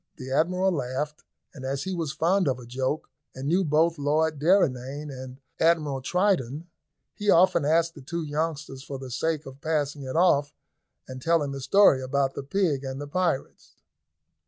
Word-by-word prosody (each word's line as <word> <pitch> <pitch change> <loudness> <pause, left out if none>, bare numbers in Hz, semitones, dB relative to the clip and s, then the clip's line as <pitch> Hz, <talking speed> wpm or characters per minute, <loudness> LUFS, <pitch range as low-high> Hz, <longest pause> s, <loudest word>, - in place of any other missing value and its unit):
The 130 -3 -7
Admiral 180 +6 +2
laughed, 145 0 -3 0.3
and 135 - -10
as 135 +1 -2
he 190 - -3
was 165 -5 -2
fond 170 +4 +1
of 130 -2 +1
a 125 - -11
joke, 130 +5 -2 0.3
and 130 +1 -5
knew 180 +5 +3
both 160 +1 +2
Lord 150 +1 +1
Derrynane 145 -4 +1
and 130 0 -9 0.2
Admiral 155 -5 +2
Triton, 170 - 0 0.5
he 205 0 -2
often 175 -4 +5
asked 165 +2 +2
the 150 - -12
two 170 +5 -4
youngsters 150 -2 -3
for 135 0 -7
the 130 -1 -8
sake 155 +4 -1
of 135 +1 -11
passing 150 -2 -1
it 130 +1 -5
off 145 -5 +3 0.5
and 130 0 -8
telling 160 -2 +1
the 135 0 -6
story 170 -3 +5
about 135 +1 0
the - - -5
pig 145 -2 0
and 135 0 -5
the 145 - -5
pirates. 170 -3 -2
145 Hz, 175 wpm, -26 LUFS, 135-165 Hz, 0.5 s, often